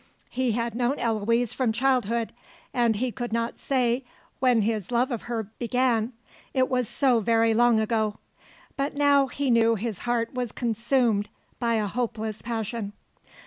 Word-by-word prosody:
He 255 -3 0
had 235 0 -1
known 245 +4 0
Eloise 230 +1 +1
from 255 -4 +1
childhood, 235 -2 +1 0.4
and 240 -3 +2
he 245 +4 -1
could 240 -1 -5
not 230 +1 -2
say 250 -1 +1 0.4
when 245 -4 +3
his 215 -3 -1
love 245 +3 +2
of 235 0 -5
her 230 -2 -1 0.2
began, 245 -1 +1 0.4
it 260 -1 +3
was 250 -3 0
so 255 -4 +3
very 225 +1 +3
long 235 0 +4
ago; 220 -1 0 0.6
but 280 +1 -2
now 285 -1 +4
he 275 0 -1
knew 230 -1 +4
his 220 -2 -4
heart 240 0 -1
was 250 -3 -3
consumed 230 -2 +1 0.3
by 235 -1 +1
a 215 -1 +1
hopeless 220 -1 -3
passion. 225 -2 -4
235 Hz, 155 wpm, -26 LUFS, 225-250 Hz, 0.6 s, long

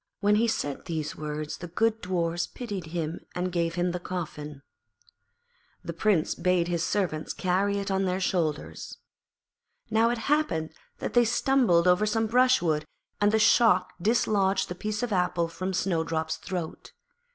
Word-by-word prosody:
When 205 0 +3
he 230 - +3
had - - +1
said 145 -8 -3
these 160 -4 -3
words 150 0 -5
the 175 - -7
good 225 +6 0
Dwarfs 175 -2 -1
pitied 205 -9 -6
him 165 -1 -3 0.2
and 180 +1 -1
gave 170 -1 -1
him 175 0 0
the 180 - -3
coffin. 150 -6 -6 1.2
The - - -5
Prince 200 -7 +1
bade 180 -2 +1
his 170 -1 -1
servants 180 -6 -1
carry 195 +2 0
it 200 0 -3
on 190 0 +1
their 185 0 0
shoulders. 170 -6 -2 0.9
Now 225 +1 +4
it 240 - 0
happened 275 - 0 0.2
that - - -4
they 240 - +6
stumbled 230 -7 +3
over 180 +4 +4
some 225 +1 +1
brushwood, 225 -10 +3 0.4
and 205 0 +4
the 220 - +3
shock 215 -4 +4
dislodged 200 -2 +2
the - - -3
piece 210 +5 -3
of 235 -4 -1
apple 180 -2 +1
from 185 +3 -4
Snowdrop's 160 -3 -1
throat. 175 -3 -6
180 Hz, 160 wpm, -27 LUFS, 165-210 Hz, 1.2 s, they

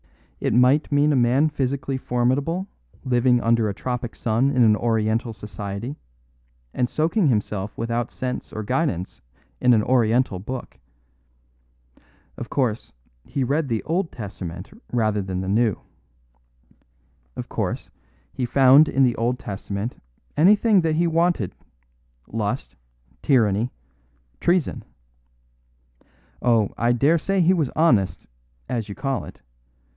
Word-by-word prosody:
It - - 0
might 130 +6 +4
mean 145 +1 +3
a - - +2
man 130 +5 +3
physically 135 -1 -2
formidable 135 +9 0 0.4
living 125 -1 +3
under 115 -2 +2
a 100 - -4
tropic 125 +1 -4
sun 115 +4 +1
in 130 -3 +3
an 110 -2 +5
Oriental 115 +1 0
society, 105 +5 -6 0.7
and 125 -1 0
soaking 165 +4 +1
himself 105 -4 -1
without 115 +1 -2
sense 125 -1 -5
or 110 - -5
guidance 125 - -2 0.4
in 125 -1 +5
an 105 - +2
Oriental 120 -4 +2
Book. 125 +6 -7 1.6
Of - - -7
course, 120 -6 -1 0.3
he 135 - -2
read 145 +4 0
the 115 -4 -2
Old 170 +2 -1
Testament 95 -4 -7 0.2
rather 110 -4 +1
than 95 -1 -3
the 95 - -4
New. 110 0 +1 1.6
Of - - -6
course, - - -3 0.4
he 130 - -3
found 135 +4 +6
in 135 - +2
the 125 -2 +3
Old 120 +2 0
Testament 100 +1 -5 0.3
anything 205 +4 +5
that 160 -2 0
he 170 +2 +2
wanted 165 - +1 0.7
lust, 110 +3 -3 0.5
tyranny, 115 -3 +2 0.7
treason. 175 -3 0 1.6
Oh, 115 -4 +3
I 120 +1 +3
dare 145 +7 +3
say 195 +4 0
he 175 +2 +4
was 155 -8 0
honest, 120 - +2 0.4
as 115 -4 -3
you 100 - -6
call 135 -2 -2
it. - - -13
125 Hz, 130 wpm, -23 LUFS, 110-145 Hz, 1.6 s, found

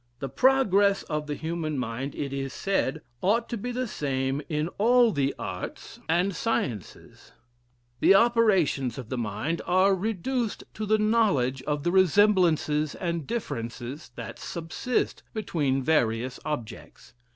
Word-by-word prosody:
The 135 +1 -5
progress 200 - +3
of 150 -1 -3
the 145 - -2
human 160 -2 -3
mind, 125 +3 -4
it 140 -1 -4
is 135 -1 -3
said, 195 -9 -1 0.2
ought 225 +5 +2
to - - -2
be 240 +3 -4
the 250 +1 -2
same 135 -5 -2
in 150 0 0
all 240 +2 +5
the 140 -4 0
arts 90 0 -6
and 180 +3 +2
sciences: 125 - -4 0.7
the 195 - +6
operations 195 - +3
of 125 -4 -7
the 130 - -3
mind 120 +10 -2
are 185 +2 +4
reduced 225 +4 -2
to 215 - -4
the 215 +1 +4
knowledge 210 - +2
of 145 -1 -1
the 175 - +1
resemblances 180 -5 +3
and 170 -4 -3
differences 120 - -5
that - - -7
subsist 170 +9 -2
between 145 -11 0
various 125 -4 +1
objects. 145 -4 -6
165 Hz, 140 wpm, -27 LUFS, 135-205 Hz, 0.7 s, the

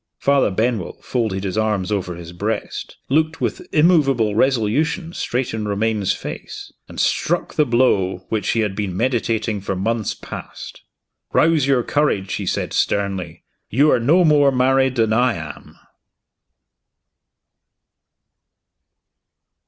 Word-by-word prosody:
Father 140 -3 +2
Benwell 110 -1 -1
folded 110 -6 -2
his 100 +2 -2
arms 105 -3 0
over 90 -4 -2
his 85 0 -10
breast 85 - -4
looked 155 +3 +1
with - - -3
immovable 140 - +3
resolution 135 - +1
straight 125 -6 -2
in 110 -1 -3
Romayne's 105 -1 0
face - - -7
and - - -9
struck - - 0
the 150 - +2
blow 95 -7 +1
which 110 -2 -1
he 115 - +1
had 105 -3 -1
been 95 -3 -3
meditating 115 -4 0
for 95 - -3
months 110 +3 -1
past. - - -9 0.5
"Rouse 155 -4 +3
your 130 -3 +3
courage," 115 -11 0
he - - -3
said - - -2
sternly. 95 -5 -1 0.3
"You 145 +7 +4
are - - +3
no 165 +10 +4
more 145 -3 +5
married 130 0 +2
than 110 -2 +2
I 120 +1 +2
am." 75 -2 -9
115 Hz, 130 wpm, -20 LUFS, 100-135 Hz, 0.5 s, more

